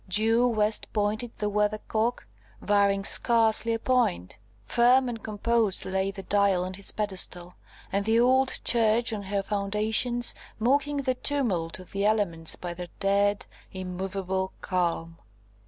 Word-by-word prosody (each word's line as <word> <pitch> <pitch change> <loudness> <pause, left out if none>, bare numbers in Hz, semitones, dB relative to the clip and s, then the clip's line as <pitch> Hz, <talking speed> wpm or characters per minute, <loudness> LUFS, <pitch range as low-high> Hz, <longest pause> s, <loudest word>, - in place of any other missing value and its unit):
Due 225 +5 +3
west 215 -2 0
pointed 215 +3 -1
the 210 - -2
Weathercock, 215 +3 -1 0.3
varying 200 -1 +1
scarcely 230 +1 +3
a - - 0
point. 225 - -1 0.2
Firm 245 - +3
and 230 -2 -5
composed 220 -1 0
lay 190 +1 -1
the 195 0 -7
Dial 200 -3 +1
on 185 - -6
his 195 +1 +1
pedestal, 185 -4 -2 0.4
and 200 +1 0
the 220 +2 +2
old 260 +2 +3
church 230 0 +2
on 210 - -4
her 200 0 -3
foundations, 215 +4 +1 0.2
mocking 285 +5 +1
the 265 -2 0
tumult 235 - -1
of 185 -1 -14
the 200 0 -2
elements 200 -7 +1
by 175 -1 -6
their 175 0 -8
dead, 200 +1 +1 0.3
immovable 190 0 -4
calm. 165 -2 -2
205 Hz, 140 wpm, -26 LUFS, 190-230 Hz, 0.4 s, Due